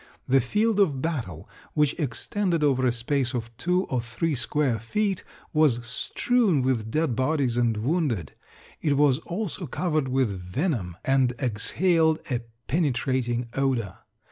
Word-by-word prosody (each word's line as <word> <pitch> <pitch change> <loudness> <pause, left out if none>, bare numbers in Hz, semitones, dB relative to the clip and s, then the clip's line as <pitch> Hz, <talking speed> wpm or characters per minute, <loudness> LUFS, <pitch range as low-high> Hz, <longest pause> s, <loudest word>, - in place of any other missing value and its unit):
The 135 +1 +4
field 210 - +1
of 155 -10 +3
battle, 125 - -3 0.3
which 150 -2 +3
extended 170 - -1
over 130 -3 +3
a - - +3
space 130 +2 -1
of 115 -1 -5
two 180 +2 +1
or 130 -8 -1
three 120 +8 -2
square 130 -2 0
feet, 195 - -1 0.3
was 140 -7 +3
strewn 185 - +1
with 120 -4 0
dead 155 -1 0
bodies 130 -2 +1
and 120 -2 +1
wounded; 120 - -1 0.5
it 145 -3 +1
was 140 -2 +4
also 175 0 -4
covered 155 -5 0
with 130 -2 +1
venom, 95 - -2
and 135 -2 +3
exhaled 160 - +2
a 125 - +1 0.3
penetrating 130 -5 0
odor. 130 -7 -1
135 Hz, 140 wpm, -26 LUFS, 120-160 Hz, 0.5 s, The